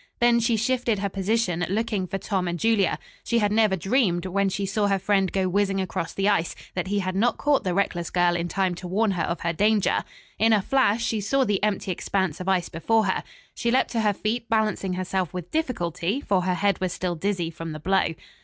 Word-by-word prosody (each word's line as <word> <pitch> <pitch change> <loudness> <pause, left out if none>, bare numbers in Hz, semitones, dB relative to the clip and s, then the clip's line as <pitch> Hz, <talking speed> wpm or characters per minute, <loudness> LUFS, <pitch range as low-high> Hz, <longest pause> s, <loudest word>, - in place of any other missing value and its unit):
Then 240 0 +4
she 230 0 +2
shifted 240 -1 0
her 200 0 -2
position, 195 -2 0
looking 210 -2 -1
for 195 - -3
Tom 190 -2 -2
and 175 0 -2
Julia. 225 -1 +2 0.3
She 235 - 0
had 205 -2 +2
never 215 -2 +3
dreamed, 190 - +1
when 195 +1 +1
she 195 +1 -2
saw 205 +1 0
her 195 -1 +2
friend 195 -1 +1
go 190 -1 0
whizzing 195 +1 +1
across 180 -3 -3
the 195 +1 -1
ice, 200 -5 +1 0.2
that 180 0 -2
he 200 +1 0
had 185 0 -3
not 235 +5 +2
caught 290 -1 +2
the 180 -2 -1
reckless 175 -4 0
girl 175 -1 +2
in 170 0 -1
time 190 0 0
to 180 +1 -7
warn 205 +4 +1
her 180 -3 -2
of 170 +1 -2
her 170 0 -1
danger. 210 +3 +2 0.4
In 225 +1 +4
a 210 - +4
flash 235 -3 +2
she 220 -2 -1
saw 270 +7 +2
the 205 -5 0
empty 205 -2 0
expanse 190 -2 -1
of 185 +1 -3
ice 185 -2 +1
before 220 +7 +1
her. 190 - 0 0.3
She 235 - -1
leaped 255 +2 +2
to 230 - 0
her 210 -1 +2
feet, 225 +3 -3
balancing 215 -4 0
herself 185 -1 -2
with 175 -1 -6
difficulty, 195 - -1
for 200 -9 +1
her 185 -1 +1
head 200 +1 +1
was 185 -1 0
still 180 0 -2
dizzy 175 -1 -2
from 165 0 -7
the 155 - -6
blow. 190 0 +1
195 Hz, 230 wpm, -25 LUFS, 180-220 Hz, 0.4 s, Then